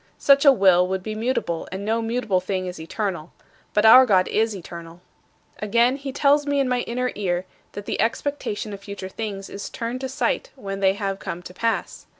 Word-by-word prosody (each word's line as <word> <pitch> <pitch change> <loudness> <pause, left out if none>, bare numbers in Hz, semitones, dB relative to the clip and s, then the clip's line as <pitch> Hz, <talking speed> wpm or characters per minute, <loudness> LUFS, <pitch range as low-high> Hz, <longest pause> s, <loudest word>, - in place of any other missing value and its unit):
Such 280 +1 +4
a 280 - +10
will 190 -6 +4
would 190 0 -3
be 215 - -4
mutable 215 -7 -2
and 190 +2 -5
no 225 +2 0
mutable 225 -4 0
thing 185 0 -3
is 180 -2 -6
eternal. 175 0 -4 0.4
But 210 +1 +2
our 255 +4 +9
God 185 -4 +4
is 220 0 +1
eternal. 170 -2 -9 0.6
"Again, 235 +5 +2
he 275 -1 -6
tells 290 +2 +3
me 285 0 +1
in 270 - +2
my 250 0 +1
inner 250 +1 -1
ear 185 -3 -2 0.3
that 205 0 -7
the - - -2
expectation 225 -3 -2
of 200 - -7
future 200 -1 -7
things 200 -1 -5
is 200 - -7
turned 240 +1 -4
to 265 - -3
sight 380 - -1
when 195 -7 -6
they 190 -1 +3
have 195 -1 -3
come 175 +1 -6
to 180 - -10
pass. 230 +4 -2
210 Hz, 200 wpm, -23 LUFS, 190-250 Hz, 0.6 s, a